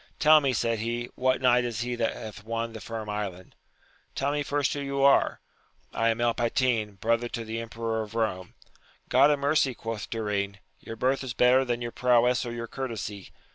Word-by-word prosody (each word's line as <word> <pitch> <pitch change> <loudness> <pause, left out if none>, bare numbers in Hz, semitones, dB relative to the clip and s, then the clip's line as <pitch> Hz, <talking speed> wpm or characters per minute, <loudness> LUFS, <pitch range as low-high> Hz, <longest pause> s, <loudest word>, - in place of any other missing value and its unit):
Tell 155 0 +6
me, 135 -2 +1
said 115 -2 0
he, 120 +2 -3
what 130 0 0
knight 125 -1 +5
is 120 -2 -3
he 125 +1 -2
that 115 -1 0
hath 105 -1 -9
won 115 +1 -3
the 110 - -8
Firm 110 -1 -6
Island! 100 -4 -5 0.3
— - - -35
Tell 140 +1 0
me 145 0 -1
first 145 0 0
who 145 - -4
you 140 -1 -1
are? 140 0 +4 0.3
— - - -40
I 115 0 +2
am 115 +1 0
El 120 0 +2
Patin, 115 -3 0
brother 115 +4 0
to 115 -1 -5
the 110 +1 -4
Emperor 115 0 -3
of 110 0 -8
Rome. 95 -5 -2 0.3
— - - -32
God 135 +3 +6
a 145 - +3
mercy! 140 -2 +1
quoth 115 -3 -5
Durin, 100 -3 -2 0.2
your 115 - -8
birth 130 +4 0
is 125 -3 -5
better 125 +2 +5
than 120 -2 -2
your 120 - -4
prowess 125 0 +2
or - - -4
your 120 0 -4
courtesy. 115 -6 -5
115 Hz, 215 wpm, -27 LUFS, 110-130 Hz, 0.3 s, Tell